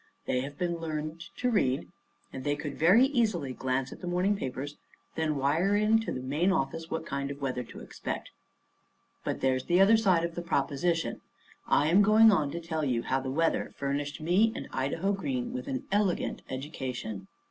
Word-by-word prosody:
They 125 - 0
have 140 +2 -7
been 170 0 -1
learned 155 0 -4 0.2
to 250 0 +1
read; 135 - +1 0.5
and 130 - -6
they 145 +1 +1
could 150 -1 -5
very 190 - +5
easily 215 - 0
glance 130 +1 -1
at - - -10
the 180 - -5
morning 180 +4 +2
papers 140 -4 -5 0.4
and 160 -1 0
then 150 - 0
wire 160 +9 +2
in 215 +2 +4
to 225 - -3
the 130 - -4
main 150 +8 +1
office 165 -1 -1
what 160 0 -3
kind 140 -1 -3
of 140 0 -6
weather 130 -3 -2
to - - -11
expect. - - -6 0.9
But - - -3
there's 130 -1 +1
the 175 +1 +3
other 205 +4 +7
side 185 -6 +3
of 170 0 -2
the 175 - -4
proposition. 165 +1 0 0.5
I 145 - +3
am 185 +5 +6
going 215 +2 +7
on 155 -8 +2
to 170 - -4
tell 160 -2 -3
you 125 -4 0
how 135 - 0
the 130 0 -4
weather 165 +5 0
furnished 140 +1 -2
me 180 +8 +3
and - - -5
Idaho 165 +9 0
Green 245 +4 -2
with 255 +1 -5
an 270 0 -3
elegant 205 -3 0
education. 130 -7 -5
160 Hz, 195 wpm, -29 LUFS, 140-195 Hz, 0.9 s, other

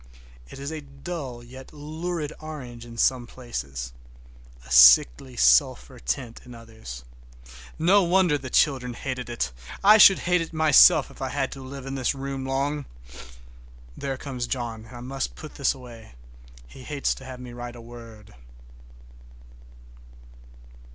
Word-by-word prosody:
It - - -11
is 140 +2 -6
a 160 -1 -5
dull 140 -3 -7
yet 130 +2 -12
lurid 155 +1 -5
orange 130 -7 -9
in 115 0 -11
some 125 0 +1
places, 65 - -6 0.7
a 65 - -14
sickly 60 - +6
sulphur - - +3
tint 60 - -4
in 125 -1 -12
others. 110 - -11 0.7
No 190 +6 +4
wonder 180 -3 +3
the 135 -2 -5
children 125 -3 +1
hated 125 -3 -5
it! 115 - -2 0.3
I 210 +2 +7
should 195 -2 +9
hate 180 0 +2
it 165 - -6
myself 155 -2 +6
if - - -15
I 130 - -2
had 135 0 -2
to 135 - -9
live 135 0 -9
in 135 - -5
this 135 +1 -1
room 135 -1 -5
long. 140 +2 -1 1.1
There 135 -1 -4
comes 130 -3 -5
John, 115 -3 -4
and 125 - -13
I - - -9
must 130 - -4
put - - -10
this - - 0
away,—he - - -15
hates 140 +1 -2
to 130 - -12
have 130 -1 -9
me 125 -1 -9
write 120 0 -7
a - - -11
word. 115 - -13
130 Hz, 150 wpm, -25 LUFS, 115-140 Hz, 1.1 s, should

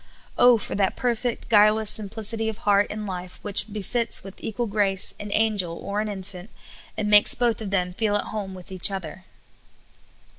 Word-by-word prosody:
Oh, 245 -1 +6
for 210 - -6
that 195 -1 0
perfect, 240 -1 -2
guileless 215 0 +4
simplicity 220 +1 -1
of 220 - -6
heart 205 0 +3
and 215 0 -5
life 180 -2 -7
which 205 +1 +3
befits 215 +3 0
with 195 0 -12
equal 235 +2 -3
grace 200 -3 +1
an 210 - -7
angel 205 -6 0
or 205 +1 -3
an 215 - -3
infant, 190 -1 -8 0.5
and 215 -1 -2
makes 210 0 +6
both 235 -2 0
of 210 - -5
them 180 -2 -1
feel 210 +1 0
at 205 - -1
home 200 -3 -5
with 185 +1 -12
each 185 0 +3
other 190 -1 -7
205 Hz, 180 wpm, -24 LUFS, 195-220 Hz, 0.5 s, Oh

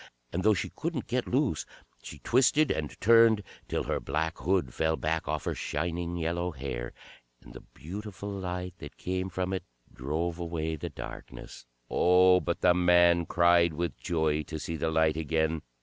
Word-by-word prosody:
And 90 - -1
though 105 +2 +4
she 85 - -3
couldn't 160 -6 -3
get 125 0 -1
loose, 125 - +1 0.4
she - - -9
twisted 135 +5 +3
and 75 -2 -3
turned, 115 0 +5 0.2
till - - -1
her - - -1
black 80 +4 -2
hood 90 -9 0
fell 80 0 +1
back 80 +1 -2
off - - -2
her - - -1
shining 85 +2 -3
yellow 85 +2 -1
hair, 65 -6 -5 0.5
and - - -13
the 65 - -10
beautiful 100 +3 -8
light 90 -2 -4
that 75 - -10
came 95 +1 -3
from 95 0 -2
it 95 - -1 0.3
drove 80 +6 -3
away 80 -2 -2
the 75 - -5
darkness. - - -9 0.2
Oh, 90 +1 +5
but 85 -1 -3
the 90 - +5
man 85 -1 +4
cried 85 -1 +4
with 85 -1 -2
joy 80 -3 0
to 80 +1 -5
see 80 +2 -4
the 80 0 -1
light 80 -1 +2
again. 80 0 0
85 Hz, 170 wpm, -29 LUFS, 80-95 Hz, 0.5 s, turned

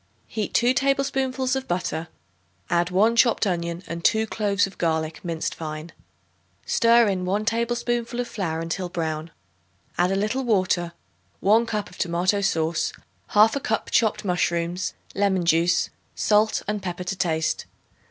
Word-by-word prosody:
Heat 215 -2 -4
2 240 +2 +4
tablespoonfuls 270 -1 0
of 265 0 -3
butter. 175 -2 -2 0.6
Add 175 0 +2
1 210 +6 +3
chopped 235 -2 +4
onion 170 -2 -2
and 170 0 -6
2 220 +4 +3
cloves 205 -2 +1
of 195 - -11
garlic 160 -1 -1
minced 165 -2 -2
fine. 155 +1 -6 0.7
Stir 230 0 +4
in 190 -2 -1
1 200 +4 -1
tablespoonful 235 +1 -1
of 245 - -1
flour 165 -8 -3
until 175 +2 -3
brown; 160 -2 -3 0.7
add 175 +1 +4
a 195 - +1
little 215 +7 0
water, 185 -6 +1 0.5
1 225 +4 +4
cup 210 -2 -2
of 180 - -15
tomato 180 +3 +1
sauce, 165 -4 0 0.4
1/2 220 +6 +5
cup 220 -3 -2
chopped 220 -2 +2
mushrooms, 175 0 -1 0.2
lemon 195 -3 +1
juice, 170 +1 +2 0.2
salt 215 +1 +2
and 210 0 -2
pepper 180 -1 -4
to 190 +2 -3
taste. 160 -3 -1
195 Hz, 145 wpm, -24 LUFS, 170-225 Hz, 0.7 s, 1/2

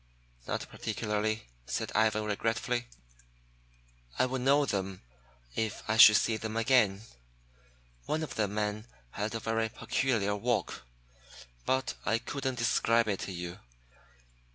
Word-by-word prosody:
"Not - - -3
particularly," 110 0 -2 0.2
said - - -2
Ivan 110 0 +2
regretfully. 115 +3 -1 1.3
"I 130 - +4
would 130 0 -2
know 140 +3 +4
them 95 - -3 0.5
if 110 -2 -2
I 110 0 +1
should 110 -1 +10
see 110 +1 +2
them 110 +1 -4
again. 115 -5 +3 1.1
One 160 +1 0
of 155 - -5
the 105 -2 0
men 105 +2 -2 0.2
had 105 +2 -3
a - - -1
very 115 0 -1
peculiar 110 -2 0
walk, 105 - -2 0.8
but 130 0 +1
I 115 - +2
couldn't 135 +2 -3
describe 115 0 +2
it 100 -3 -1
to - - -5
you. 90 0 -6
110 Hz, 130 wpm, -30 LUFS, 105-120 Hz, 1.3 s, should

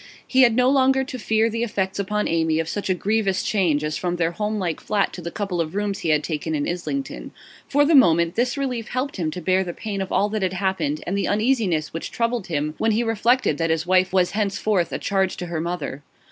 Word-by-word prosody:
He 265 - +3
had 235 -3 +5
no 250 +1 +4
longer 265 0 +3
to 260 -1 -7
fear 220 0 +2
the 230 0 -3
effects 200 -4 -2
upon 210 +2 -1
Amy 160 -1 +1
of 165 0 -1
such 200 +3 -3
a 185 - +3
grievous 200 0 0
change 170 -8 +1
as 150 0 -2
from 175 -1 -2
their 170 -1 0
homelike 205 -3 -2
flat 205 -2 0
to 180 - -7
the 170 - -4
couple 185 -2 -2
of 160 +2 -4
rooms 205 -1 -1
he 165 - -2
had 150 -1 +3
taken 155 0 -3
in 145 - -1
Islington; 225 +11 -4 0.4
for 290 +1 +3
the 325 - +3
moment, 170 - +5
this 245 +4 0
relief 250 -5 -2
helped 260 +1 -3
him 165 -4 -1
to 180 - -5
bear 185 +2 +2
the 175 -2 -6
pain 205 -3 -4
of 190 - -4
all 205 - +2
that 215 0 -2
had 185 -1 0
happened 200 +12 -1
and - - -2
the 200 - 0
uneasiness 210 - +1
which 165 - -4
troubled 230 -3 -1
him 150 -2 -2
when 225 0 +2
he 230 +3 +1
reflected 225 - +1
that 165 0 0
his 160 +1 0
wife 185 +1 +3
was 185 -1 +2
henceforth 205 -3 0
a - - -2
charge 190 -2 0
to 180 - -4
her 170 -2 -3
mother. 170 -5 -4
195 Hz, 240 wpm, -23 LUFS, 170-225 Hz, 0.4 s, had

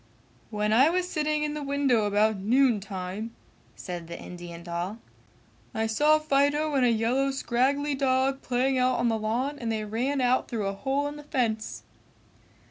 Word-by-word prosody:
"When 210 -1 0
I 265 +7 +6
was 360 +1 0
sitting 305 -3 -1
in 300 0 -1
the 300 - -4
window 275 -6 +1
about 210 +1 +2
noon 235 +3 +3
time," 195 +3 -6 0.4
said 175 -3 -7
the 170 - -7
Indian 175 -1 -9
doll, 175 +4 -4 0.8
"I 220 0 0
saw 295 +8 +4
Fido 295 0 +1
and 270 -2 +2
a 245 - +4
yellow 235 +5 +1
scraggly 270 +2 0
dog 265 0 +1
playing 255 +1 +1
out 255 0 +2
on 240 0 +1
the 225 -1 0
lawn 245 +7 -2
and 230 -2 -2
they 215 -1 -2
ran 250 +7 -1
out 255 0 +2
through 225 -5 -3
a 195 - -1
hole 270 +7 -1
in 290 +1 -4
the 295 - -10
fence!" 230 -6 -2
250 Hz, 175 wpm, -27 LUFS, 215-280 Hz, 0.8 s, I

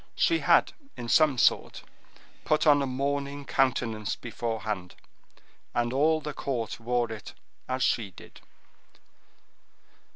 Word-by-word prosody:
She 335 -1 +3
had, - - +4 0.2
in 120 -1 -6
some 155 -2 +4
sort, - - +2 0.6
put 155 +1 +2
on 145 -2 +6
a 140 - -1
mourning 140 +2 -2
countenance 115 -6 0
beforehand, 110 -6 -4 0.8
and 120 +1 0
all 155 +3 +3
the 150 0 -5
court 125 -6 -3
wore 120 0 -1
it 110 -2 -8 0.3
as 130 0 0
she 115 -4 +1
did. 90 - -15
125 Hz, 120 wpm, -28 LUFS, 115-140 Hz, 0.8 s, on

